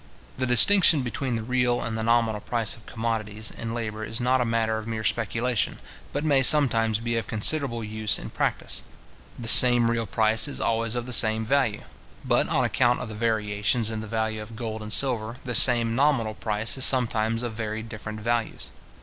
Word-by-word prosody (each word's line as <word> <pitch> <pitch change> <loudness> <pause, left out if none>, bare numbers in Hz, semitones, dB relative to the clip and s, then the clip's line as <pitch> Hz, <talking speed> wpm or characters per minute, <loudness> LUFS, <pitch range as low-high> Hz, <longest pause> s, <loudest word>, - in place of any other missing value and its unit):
The 130 0 -3
distinction 160 +3 +5
between 125 +1 -4
the 115 - -4
real 125 0 0
and 110 - -4
the 110 - -3
nominal 115 -2 +1
price 115 -3 -2
of 110 - -19
commodities 110 -2 -4
and 115 0 -6
labour 110 -2 -5
is 110 +1 -5
not 125 +1 +1
a - - 0
matter 115 -1 -1
of 110 - -10
mere 110 -1 -4
speculation, 115 +2 -1 0.3
but 145 - -3
may 140 -3 +2
sometimes 115 -7 +3
be 115 0 -3
of 115 - -4
considerable 115 +1 +1
use 110 0 -2
in - - -9
practice. - - -3 0.6
The 115 - -7
same 120 0 +6
real 115 -1 -2
price 110 +5 +1
is 145 - -4
always 115 0 -1
of 120 -1 -3
the 125 - -4
same 110 -1 +5
value; 120 -4 0 0.4
but - - +1
on - - +1
account 125 -1 +1
of - - -6
the - - -8
variations 105 0 -1
in 110 -1 -5
the 110 - -8
value 110 0 -3
of 110 +1 -11
gold 110 -1 -6
and 105 0 -8
silver, 120 -3 -1
the 125 - -5
same 120 -1 +4
nominal 130 -4 +1
price 110 +3 -1
is - - +3
sometimes 115 -2 +1
of 120 -2 -4
very 110 0 -5
different 110 -1 -8
values. 120 0 -3
115 Hz, 195 wpm, -24 LUFS, 110-120 Hz, 0.6 s, same